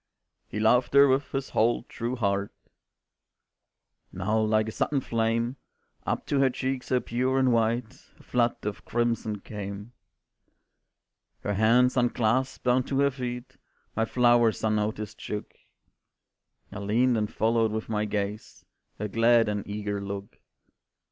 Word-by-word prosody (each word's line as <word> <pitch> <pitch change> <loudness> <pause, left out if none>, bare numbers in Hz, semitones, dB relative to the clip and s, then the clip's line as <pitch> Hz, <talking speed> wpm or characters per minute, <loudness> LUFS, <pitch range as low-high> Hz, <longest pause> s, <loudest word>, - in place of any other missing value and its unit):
"He 105 - -5
loved 120 +5 +3
her 140 0 +8
with 135 +1 +1
his 135 -1 -3
whole 115 +2 +2
true 120 +1 -4
heart," 100 -3 -1 1.6
Now 105 +4 0
like 110 0 +2
a - - -3
sudden 140 +5 0
flame 115 +1 -1 0.5
Up - - -1
to 140 - 0
her 135 -1 +4
cheek 130 +1 -2
so 130 0 0
pure 125 +3 -1
and 130 -2 +3
white, 115 0 +1 0.3
A - - -17
flood 120 -1 +1
of 105 0 -4
crimson 115 -3 -1
came. 105 +2 -7 1.5
Her 105 - -2
hands 120 +5 +3
unclasped, 120 +1 +1
down 125 +1 +3
to 135 - -1
her 140 0 +3
feet 125 -2 -6 0.4
My 110 - +1
flowers 120 -2 +3
unnoticed 110 0 -1
shook; 105 -1 -5 1.2
I 105 - -6
leaned 115 +5 +2
and 105 -2 -1
followed 115 0 +1
with 110 0 -3
my 105 -1 -1
gaze 105 0 -4 0.3
Her 105 - -3
glad 115 +2 +4
and 105 -1 -3
eager 105 -1 -3
look. 100 0 -7
115 Hz, 140 wpm, -27 LUFS, 105-125 Hz, 1.6 s, her